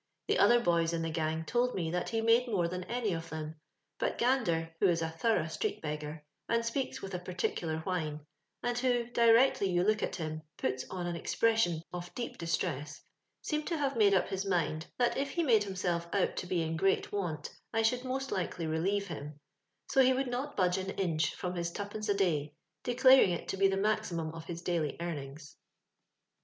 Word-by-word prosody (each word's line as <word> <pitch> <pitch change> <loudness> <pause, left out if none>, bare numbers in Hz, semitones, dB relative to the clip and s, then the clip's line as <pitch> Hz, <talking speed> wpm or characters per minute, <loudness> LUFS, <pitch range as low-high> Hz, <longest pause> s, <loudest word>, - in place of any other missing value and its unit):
The - - +2
other 240 0 +6
boys 170 -5 +2
in 165 -1 -1
the 165 - -2
gang 160 0 -1
told 250 +4 +1
me 165 -3 -1
that 180 0 -1
he 225 -1 0
made 230 +2 +4
more 190 -7 +1
than 180 +1 -4
any 235 -4 -1
of 165 0 -5
them. 155 0 -5 0.4
But - - -1
Gander, 175 -11 +1
who 200 - +5
is 170 -2 +2
a 160 - -2
thorough 165 +3 +1
street 160 - -2
beggar, 150 0 -5 0.2
and 230 0 +2
speaks 255 +3 -2
with 195 0 -6
a 180 - -2
peculiar 175 -3 -2
whine, 155 -4 -3 0.4
and 245 0 0
who, 245 -2 +2
directly 230 -3 +5
you 175 -1 +2
look 215 +2 +2
at - - -2
him, 155 -3 -4 0.2
puts 130 0 -2
on 185 -2 -4
an 175 -1 -2
expression 175 -3 +1
of 175 0 -6
deep 240 - -5
distress, 155 -4 -2 0.4
seemed 300 0 -2
to 335 - -1
have 275 -2 0
made 205 -3 +5
up 185 - +2
his 195 0 -2
mind, 165 -4 0
that 245 -1 +2
if 275 +1 -1
he 340 - 0
made 225 -8 +4
himself 180 -3 -2
out 200 - +1
to 180 - -3
be 175 -2 0
in 160 0 -2
great 195 +4 +1
want 170 -7 -3 0.2
I 225 0 +1
should 245 +3 +2
most 265 +1 -3
likely 175 -2 -2
relieve 185 +6 0
him 150 -4 -7 0.2
— - - -16
so 270 - +5
he 260 0 +5
would 260 -1 -1
not 255 +4 -3
budge 180 -1 +2
an 190 0 -4
inch 165 -4 0
from 180 0 -3
his 170 -1 -2
twopence 205 +3 -5
a 200 - +3
day, 155 -6 0 0.3
declaring 255 -2 +6
it 170 - -5
to 195 - -2
be 195 0 +5
the 195 0 0
maximum 175 -6 0
of 165 0 -8
his 170 0 -6
daily 165 -5 -1
earnings. 145 -3 -6
180 Hz, 205 wpm, -32 LUFS, 165-225 Hz, 0.4 s, other